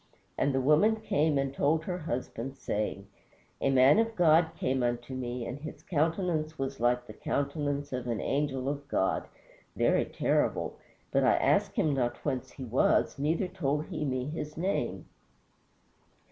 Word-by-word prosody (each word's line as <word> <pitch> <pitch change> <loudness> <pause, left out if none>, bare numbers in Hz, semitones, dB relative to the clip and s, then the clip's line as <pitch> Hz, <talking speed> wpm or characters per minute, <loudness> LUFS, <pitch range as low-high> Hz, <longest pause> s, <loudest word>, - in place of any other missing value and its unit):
And 140 - +1
the 135 - +1
woman 155 +11 +4
came 155 -9 +1
and 135 0 -1
told 155 +3 +1
her 180 +1 -3
husband, 135 -3 -4
saying, 105 -1 -3 0.6
"A - - +2
man 135 +7 +6
of 225 0 +1
God 165 -2 +5
came 130 0 0
unto 120 +1 -2
me, 125 -2 -4
and 125 +4 -5
his 155 - -9
countenance 160 -1 0
was 135 0 -3
like 120 +1 +2
the - - -10
countenance 145 0 -2
of 125 -1 -3
an 115 -2 -1
angel 135 -2 -1
of 140 0 -3
God, 95 -8 0 0.5
very - - +3
terrible; - - 0 0.4
but - - +3
I - - +5
asked - - +2
him 150 - +2
not 120 -3 0
whence 130 -3 -2
he 135 - -7
was, 125 +3 +2
neither 160 +6 +1
told 150 -5 -1
he - - -4
me 130 -3 -1
his 150 +1 -5
name." 185 +4 -1
140 Hz, 160 wpm, -30 LUFS, 130-155 Hz, 0.6 s, man